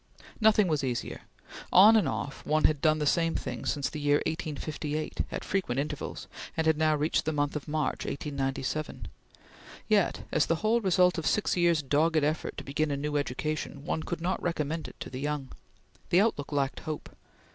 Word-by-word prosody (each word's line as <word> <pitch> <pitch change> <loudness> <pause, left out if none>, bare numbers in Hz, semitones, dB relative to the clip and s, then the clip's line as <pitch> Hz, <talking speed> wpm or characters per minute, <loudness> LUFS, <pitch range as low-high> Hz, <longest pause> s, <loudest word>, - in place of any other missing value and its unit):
Nothing 215 -3 +5
was 155 -4 0
easier! 125 -3 -3 0.5
On 210 +5 +8
and 220 - +3
off, 140 - -4
one 155 +1 +1
had 150 -2 +3
done 155 0 +4
the 150 - -1
same 165 +2 +2
thing 125 -3 -4
since 145 -2 0
the 155 - -6
year 145 0 +3
1858, 155 -1 -3
at - - -4
frequent 180 -11 -1
intervals, 150 +1 -4 0.3
and 160 - +1
had 160 0 +4
now 155 0 +2
reached 150 +2 +1
the 155 - +1
month 145 -1 -1
of 150 - -4
March, 150 -2 -1
1897; 140 +1 -3 0.8
yet, - - +2
as - - +2
the 165 - +2
whole 230 +2 +3
result 180 -2 +3
of 160 - -2
six 210 - +1
years' 170 -3 +3
dogged 155 +3 +2
effort 155 +2 -1
to - - -5
begin 150 +2 -1
a 140 - -1
new 150 +1 -3
education, 145 +1 -2
one 160 - -1
could 170 +1 -4
not 180 +2 -1
recommend 160 -2 -2
it - - -12
to - - -6
the 130 - -5
young. 145 -2 -2 0.6
The 180 - +5
outlook 180 -11 0
lacked 140 -2 0
hope. 155 -1 -6
155 Hz, 190 wpm, -29 LUFS, 145-165 Hz, 0.8 s, On